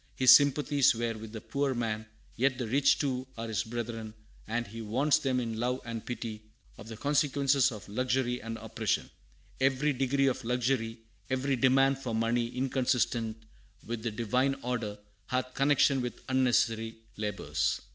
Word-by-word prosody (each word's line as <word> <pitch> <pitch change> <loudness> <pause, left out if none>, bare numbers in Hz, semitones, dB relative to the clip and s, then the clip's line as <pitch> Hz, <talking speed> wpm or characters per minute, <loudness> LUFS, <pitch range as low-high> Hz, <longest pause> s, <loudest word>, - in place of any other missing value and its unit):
His 130 -1 +7
sympathies 145 -1 +4
were 115 0 -1
with 110 0 -9
the 110 -1 -7
poor 140 -1 -1
man, 110 -2 -2 0.3
yet 130 +1 +1
the 125 -3 -3
rich 135 +4 +4
too 130 -3 -2
are 115 0 -4
his 110 -1 0
brethren, 115 -1 -5 0.3
and 120 +2 -1
he 115 +2 -8
warns 130 +8 +2
them 130 -4 0
in 115 -2 -3
love 125 +2 0
and 115 -2 -5
pity 115 -3 -5 0.4
of 105 - -10
the 110 -1 -8
consequences 140 -1 +2
of 105 -4 -9
luxury 125 +3 0
and 115 0 -5
oppression: - - -2 0.5
"Every 135 +2 +2
degree 135 +1 +1
of 130 -1 0
luxury, 120 -1 0 0.3
every 135 +1 0
demand 135 +2 +3
for 125 -4 -3
money 115 +1 +1
inconsistent 120 -3 -1 0.4
with 115 -1 -4
the 115 - -1
Divine 125 +5 0
order, 120 -4 -2 0.3
hath 130 0 -2
connection 135 -1 +3
with 120 -2 -5
unnecessary 120 -3 +1 0.2
labors." 100 -9 -1
125 Hz, 155 wpm, -30 LUFS, 115-135 Hz, 0.5 s, His